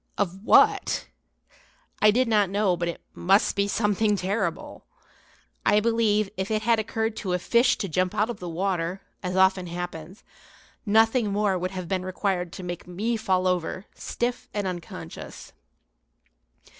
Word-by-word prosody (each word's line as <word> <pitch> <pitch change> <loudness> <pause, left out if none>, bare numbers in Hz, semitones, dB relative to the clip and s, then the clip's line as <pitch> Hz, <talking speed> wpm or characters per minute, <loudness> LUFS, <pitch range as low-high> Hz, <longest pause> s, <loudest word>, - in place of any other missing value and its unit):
Of 195 0 -2
what? - - +4 1.0
I 210 - +7
did 250 +4 +3
not 210 -4 +3
know, 195 -2 +1
but 170 0 -2
it 170 - -5
must 195 +4 +2
be 200 0 +1
something 210 +1 +1
terrible. 200 +3 -3 0.8
I 210 - +4
believe 215 -2 +2
if 190 +1 -2
it 215 -1 0
had 230 0 +3
occurred 220 0 -2
to 185 -4 -2
a - - +2
fish 235 +7 +3
to 200 - -3
jump 185 +2 0
out 210 - +2
of 235 -3 -6
the 180 - -6
water, 180 +1 -2 0.2
as 180 -1 -3
often 190 -1 +3
happens, 175 +3 -7 0.6
nothing 225 +1 +3
more 205 -1 +1
would 180 0 -2
have 185 -2 -6
been 185 -1 -1
required 185 -1 -2
to 185 - -8
make 175 0 -6
me 210 +7 -1
fall 190 -4 0
over, 180 +1 -1
stiff 240 +1 -3
and 205 -1 -1
unconscious. 170 - -7
195 Hz, 155 wpm, -25 LUFS, 180-215 Hz, 1.0 s, I